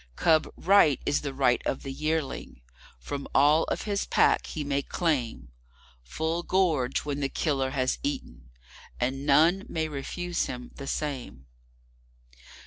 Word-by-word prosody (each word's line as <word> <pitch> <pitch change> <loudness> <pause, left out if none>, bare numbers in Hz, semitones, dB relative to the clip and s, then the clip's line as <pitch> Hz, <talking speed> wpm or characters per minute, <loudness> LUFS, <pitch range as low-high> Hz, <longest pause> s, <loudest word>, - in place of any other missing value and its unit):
Cub 160 - +3
Right 185 -7 +5
is 145 - +1
the 145 - -3
right 130 -2 +2
of - - -2
the 135 - -5
Yearling. 155 - -3 0.4
From 140 - -6
all 150 +4 +5
of - - -3
his 200 -2 -2
Pack - - +3
he 155 - -4
may 140 0 0
claimFull 65 - -4
gorge 155 -11 +1
when 145 -1 -2
the 140 -1 -1
killer 135 -4 0
has 130 -1 -1
eaten; - - -5 0.5
and 135 +3 -2
none 165 +7 +5
may 160 -1 -1
refuse 170 +4 -3
him 125 -1 -7
the 140 - -8
same. 130 - -4
140 Hz, 135 wpm, -27 LUFS, 125-160 Hz, 0.5 s, Right